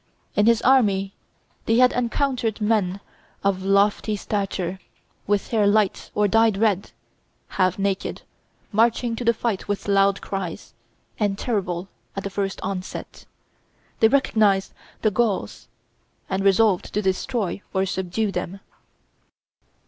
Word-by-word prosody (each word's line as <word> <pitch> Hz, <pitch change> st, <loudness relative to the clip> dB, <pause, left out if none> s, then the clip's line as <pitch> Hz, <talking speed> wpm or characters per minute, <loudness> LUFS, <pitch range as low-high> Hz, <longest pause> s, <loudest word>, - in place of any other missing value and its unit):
In 205 Hz, +1 st, +3 dB
his 230 Hz, -1 st, +4 dB
army 200 Hz, -7 st, +3 dB, 0.5 s
they 225 Hz, -, +3 dB
had 250 Hz, +1 st, +5 dB
encountered 245 Hz, -2 st, -1 dB
men 205 Hz, -3 st, 0 dB, 0.4 s
of 195 Hz, -1 st, +1 dB
lofty 200 Hz, +2 st, +2 dB
stature, 195 Hz, -3 st, -3 dB, 0.5 s
with 205 Hz, 0 st, 0 dB
hair 215 Hz, -3 st, +2 dB
light 205 Hz, -1 st, +1 dB
or 210 Hz, 0 st, +3 dB
dyed 225 Hz, 0 st, +3 dB
red, 205 Hz, -3 st, +1 dB, 0.6 s
half 185 Hz, -2 st, +1 dB
naked, 195 Hz, -1 st, -2 dB, 0.5 s
marching 230 Hz, +2 st, +2 dB
to 245 Hz, -, -5 dB
the 235 Hz, -, +4 dB
fight 225 Hz, -3 st, -3 dB
with 205 Hz, 0 st, -3 dB
loud 200 Hz, 0 st, +3 dB
cries, 190 Hz, -4 st, -5 dB, 0.5 s
and 200 Hz, -2 st, 0 dB
terrible 190 Hz, -6 st, -2 dB, 0.3 s
at 195 Hz, -, -4 dB
the 200 Hz, -, -4 dB
first 195 Hz, 0 st, -2 dB
onset. 185 Hz, -1 st, -6 dB, 0.7 s
They 225 Hz, -, +6 dB
recognized 215 Hz, -7 st, +2 dB, 0.3 s
the 215 Hz, -, +3 dB
Gauls, 220 Hz, -2 st, -1 dB, 0.6 s
and 190 Hz, 0 st, -1 dB
resolved 195 Hz, -1 st, +3 dB
to 210 Hz, -, +2 dB
destroy 190 Hz, +1 st, -1 dB
or 190 Hz, -1 st, +1 dB
subdue 190 Hz, +3 st, -2 dB
them. 180 Hz, +1 st, -4 dB
200 Hz, 125 wpm, -23 LUFS, 195-225 Hz, 0.7 s, They